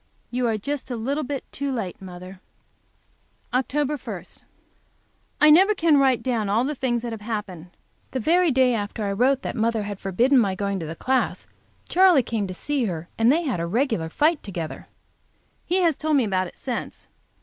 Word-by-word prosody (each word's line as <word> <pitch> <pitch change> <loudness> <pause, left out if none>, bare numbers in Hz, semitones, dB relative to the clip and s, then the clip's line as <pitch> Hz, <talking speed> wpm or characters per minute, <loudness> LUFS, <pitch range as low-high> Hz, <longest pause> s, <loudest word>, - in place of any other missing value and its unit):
You 245 0 0
are 225 -2 0
just 280 +6 -4
a 245 - -3
little 275 +7 -2
bit 275 0 -4
too 280 0 -3
late, 205 -9 -4
mother. 185 0 -10 1.1
Oct 285 +3 0 0.4
1. - - -31 0.9
I 300 0 +7
never 385 +7 +6
can 325 -5 +4
write 265 -3 +3
down 230 -6 -1
all 220 +4 +2
the 290 +3 -1
things 245 -4 -1
that 240 - -4
have 225 -2 -6
happened. 205 -6 -5 0.4
The 260 - -3
very 345 +8 +3
day 260 -2 +3
after 210 0 -3
I 200 - -1
wrote 260 +6 +2
that - - -4
mother 225 -1 0
had 205 -1 -6
forbidden 240 +8 +3
my 195 -5 +1
going 200 0 -2
to 160 - -5
the 160 - -6
class, 260 +8 0 0.4
Charley 360 -7 +5
came 220 -3 -2
to 185 - -5
see 285 +3 -1
her, 170 -4 -4
and 225 +2 +5
they 330 +4 +2
had 255 - -1
a 170 - -2
regular 225 - 0
fight 305 - +2
together. 170 -6 -6 0.8
He 370 +2 +2
has 330 -5 +2
told 310 -1 +2
me 265 - +3
about 185 -3 0
it - - -14
since. 250 -3 -5
240 Hz, 195 wpm, -24 LUFS, 200-280 Hz, 1.1 s, I